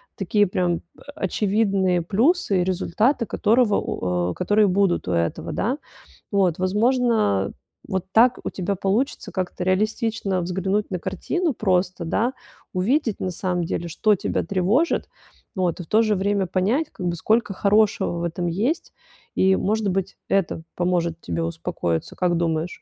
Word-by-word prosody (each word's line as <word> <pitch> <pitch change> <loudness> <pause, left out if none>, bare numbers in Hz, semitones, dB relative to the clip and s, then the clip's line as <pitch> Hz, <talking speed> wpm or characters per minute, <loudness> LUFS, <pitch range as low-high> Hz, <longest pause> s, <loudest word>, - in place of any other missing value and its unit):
Такие 205 +2 +2
прям 180 -2 0 0.2
о - - -18 0.2
очевидные 195 -4 +1
плюсы 215 - +2
и - - +2
результаты, 210 +7 +1
которого 220 -1 +2
у 90 -1 -1
о, - - -4
которые 210 - +2
будут 190 - +1
у - - -1
этого, 85 -1 -1
да. 245 +7 -1 0.5
Вот. 190 -5 +2
Возможно, 210 - +2 0.4
вот 190 -3 -2
так 240 +4 +5
у - - -2
тебя 190 +1 -2
получится 200 +8 -1
как-то 185 -1 -3
реалистично 210 0 0
взглянуть 190 +4 -1
на 185 - -1
картину, 325 - -1
просто, 185 -4 0
да. 225 +10 0 0.4
Увидеть, 225 +5 +1
на 185 - -2
самом 180 0 -1
деле, 170 +1 -3
что 210 +6 +2
тебя - - -1
тревожит, 200 - +1 0.5
вот. 180 -3 0
И - - -4
в - - -17
то 215 +6 +4
же 215 -2 +2
время 200 0 0
понять, 205 - +1
как 185 - -7
бы, 170 - -1
сколько 215 +4 +1
хорошего 200 -2 +2
в - - -3
этом 175 +1 -2
есть, 220 - -1 0.4
и, 190 0 +4
может 215 +2 0
быть, 190 0 -2
это 185 -4 0
поможет 170 -2 0
тебе 165 - -3
успокоиться, 165 - -3
как 175 -2 +1
думаешь? 165 0 -2
190 Hz, 155 wpm, -23 LUFS, 175-215 Hz, 0.5 s, так